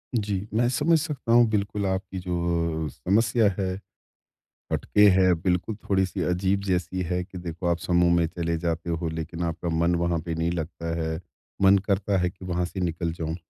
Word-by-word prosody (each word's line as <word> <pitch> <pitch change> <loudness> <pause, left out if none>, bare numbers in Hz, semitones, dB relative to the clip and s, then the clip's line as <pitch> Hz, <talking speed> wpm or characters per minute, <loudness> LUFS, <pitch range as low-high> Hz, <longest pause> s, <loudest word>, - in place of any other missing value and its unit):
जी, 105 -2 -1
मैं 120 +2 +3
समझ 150 +6 +3
सकता 145 -6 -3
हूँ, 120 0 +7
बिल्कुल 100 -1 -1
आपकी 95 0 -3
जो 85 -3 -1
समस्या 105 - +2
है, 95 -1 0 1.0
हटके 105 - +3
है, 95 -1 +4
बिल्कुल 90 +5 -1
थोड़ी-सी 95 -2 +1
अजीब 95 +2 +1
जैसी 90 0 -1
है 90 +1 -1
कि 90 0 -10
देखो, 85 0 -5
आप 85 0 +2
समूह 85 0 +2
में 85 -1 +3
चले 85 0 -2
जाते 85 0 -2
हो, 85 0 -1
लेकिन 80 +1 -5
आपका 85 +1 -3
मन 85 +1 +2
वहाँ 85 -1 +1
पे 85 - -2
नहीं 80 +1 0
लगता 85 0 -4
है, 80 +1 -2 0.4
मन 95 +1 +7
करता 100 -1 +1
है 90 0 +1
कि 95 +1 -13
वहाँ 90 -1 -1
से 95 +2 -5
निकल 85 -1 -1
जाऊँ। 80 -1 -4
90 Hz, 180 wpm, -26 LUFS, 85-100 Hz, 1.0 s, हूँ